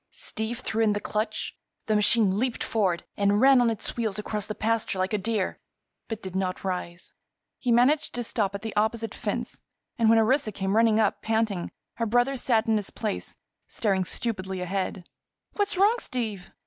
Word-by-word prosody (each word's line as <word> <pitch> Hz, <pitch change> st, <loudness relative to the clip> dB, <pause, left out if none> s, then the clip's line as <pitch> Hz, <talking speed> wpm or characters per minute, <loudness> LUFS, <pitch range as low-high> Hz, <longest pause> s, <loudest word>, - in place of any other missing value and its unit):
Steve 225 Hz, +3 st, -4 dB
threw 225 Hz, -2 st, -1 dB
in 215 Hz, -2 st, +4 dB
the 205 Hz, -, -1 dB
clutch; 215 Hz, +2 st, -2 dB, 0.3 s
the 215 Hz, -, +1 dB
machine 210 Hz, -2 st, +3 dB
leaped 250 Hz, 0 st, -1 dB
forward 190 Hz, -6 st, 0 dB
and 205 Hz, 0 st, +2 dB
ran 265 Hz, +1 st, +7 dB
on 240 Hz, -, +4 dB
its 225 Hz, -, -3 dB
wheels 220 Hz, -4 st, -1 dB
across 210 Hz, -1 st, -3 dB
the 215 Hz, -, -4 dB
pasture 225 Hz, -3 st, 0 dB
like 185 Hz, +2 st, -1 dB
a -, -, +3 dB
deer, 215 Hz, -1 st, -1 dB, 0.5 s
but 225 Hz, -1 st, -5 dB
did 190 Hz, -1 st, -6 dB
not 185 Hz, -1 st, -2 dB
rise. 180 Hz, -2 st, -4 dB, 0.5 s
He 245 Hz, -, 0 dB
managed 265 Hz, +6 st, +3 dB
to 240 Hz, -, -2 dB
stop 205 Hz, -4 st, -1 dB
at 200 Hz, -, -6 dB
the 220 Hz, -, -5 dB
opposite 220 Hz, +1 st, 0 dB
fence -, -, -4 dB, 0.4 s
and 225 Hz, -1 st, +4 dB
when 225 Hz, -, +6 dB
Orissa 225 Hz, +1 st, +3 dB
came 195 Hz, 0 st, -1 dB
running 225 Hz, -1 st, +4 dB
up, 215 Hz, -2 st, +1 dB
panting, 220 Hz, -5 st, 0 dB, 0.3 s
her 230 Hz, -, 0 dB
brother 245 Hz, +4 st, +2 dB
sat 235 Hz, -3 st, +1 dB
in 225 Hz, -2 st, +2 dB
his 205 Hz, -, -3 dB
place 215 Hz, -3 st, -4 dB, 0.3 s
staring 195 Hz, -4 st, 0 dB
stupidly 190 Hz, -1 st, -3 dB
ahead. 185 Hz, 0 st, -3 dB, 0.5 s
"What's 405 Hz, -2 st, -1 dB
wrong, 415 Hz, +5 st, +4 dB
Steve?" 220 Hz, -, -4 dB
220 Hz, 185 wpm, -27 LUFS, 195-230 Hz, 0.5 s, ran